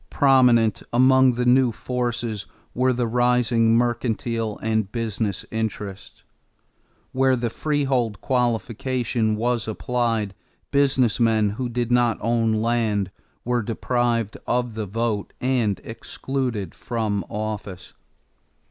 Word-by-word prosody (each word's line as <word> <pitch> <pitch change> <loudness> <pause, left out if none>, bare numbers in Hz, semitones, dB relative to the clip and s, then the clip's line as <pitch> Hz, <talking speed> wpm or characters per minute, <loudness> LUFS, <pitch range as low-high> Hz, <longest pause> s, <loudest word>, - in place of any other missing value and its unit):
Prominent 125 -6 +4
among 130 +1 +5
the 125 +1 -1
new 125 0 +4
forces 120 -3 -3 0.3
were 130 +1 +2
the 125 -1 0
rising 120 -1 +3
mercantile 115 -2 -1
and 110 -2 0
business 110 -4 -2
interests. 105 -3 -5 0.9
Where 130 0 +3
the 120 -2 -2
freehold 135 -8 0
qualification 120 -1 0
was 115 +1 -1
applied, 115 -2 -1 0.4
business 135 -5 +2
men 110 -3 +3
who 125 +4 -3
did 120 0 -2
not 120 -2 +3
own 115 0 +1
land 110 -5 0 0.3
were 120 0 +1
deprived 115 -1 -1
of 120 -1 0
the 110 -1 -4
vote 110 0 -2
and 125 -6 0
excluded 115 -3 -4
from 110 -4 -2
office. 105 -4 -5
115 Hz, 110 wpm, -23 LUFS, 110-125 Hz, 0.9 s, among